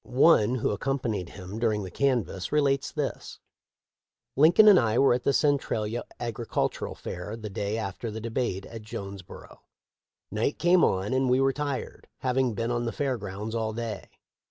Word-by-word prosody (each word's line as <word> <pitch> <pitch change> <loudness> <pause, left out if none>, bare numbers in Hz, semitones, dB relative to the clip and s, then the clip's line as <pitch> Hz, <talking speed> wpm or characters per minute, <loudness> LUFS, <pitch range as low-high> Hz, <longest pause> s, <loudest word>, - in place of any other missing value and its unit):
One 125 -4 +4
who 120 - 0
accompanied 110 -5 -2
him 95 +2 -8
during 110 -3 +1
the 95 - -7
canvass* 120 -7 -1
relates 140 -2 +1
this: 145 -3 -4 1.0
"Lincoln 165 +9 +6
and 200 -4 +9
I 115 -1 +1
were 135 -1 +5
at 125 - 0
the - - +4
Centralia 120 -6 0
agricultural 115 -1 -2
fair 90 +5 -6
the 110 -2 -7
day 105 +1 -2
after 110 +2 -4
the 110 +1 -5
debate 110 -4 -2
at 115 - -9
Jones 100 -2 -7
boro. 90 - -13 0.7
Night 110 +7 -1
came 175 0 +4
on 95 +6 +1
and 130 0 +2
we 125 +1 +4
were 135 0 +3
tired, 145 -2 -4
having 130 -2 +1
been 115 +1 -1
on 120 0 -1
the 115 - -1
fair 135 -1 -1
grounds 100 +2 -6
all 110 -1 -1
day. 115 -3 -5
115 Hz, 170 wpm, -27 LUFS, 105-135 Hz, 1.0 s, and